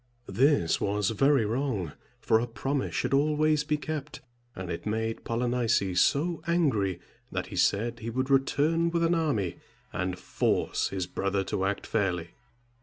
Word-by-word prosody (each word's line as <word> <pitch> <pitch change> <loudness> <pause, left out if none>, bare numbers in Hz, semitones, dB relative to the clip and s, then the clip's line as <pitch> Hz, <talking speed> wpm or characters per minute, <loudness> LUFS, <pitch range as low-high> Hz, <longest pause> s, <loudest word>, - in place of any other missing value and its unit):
This 135 - +2
was 105 +1 +1
very 135 +2 +3
wrong, 110 - -1 0.3
for 110 - +3
a 120 - -2
promise 135 +4 -2
should 125 +1 0
always 150 +1 +3
be 150 0 0
kept; 150 -1 -5 0.4
and 90 -1 -5
it 85 - -5
made 110 +1 -2
Polynices 115 -6 +1
so 165 +4 +1
angry, 115 - +1 0.3
that - - -2
he - - -5
said 115 +3 +1
he 115 - -5
would 130 +3 -2
return 150 +5 +2
with 170 0 0
an 165 +1 +3
army, 120 - 0 0.4
and 90 0 -2
force - - 0
his 95 -2 -2
brother 100 +2 -1
to 95 0 -2
act 95 +1 -2
fairly. 90 -6 -1
120 Hz, 155 wpm, -28 LUFS, 100-145 Hz, 0.4 s, very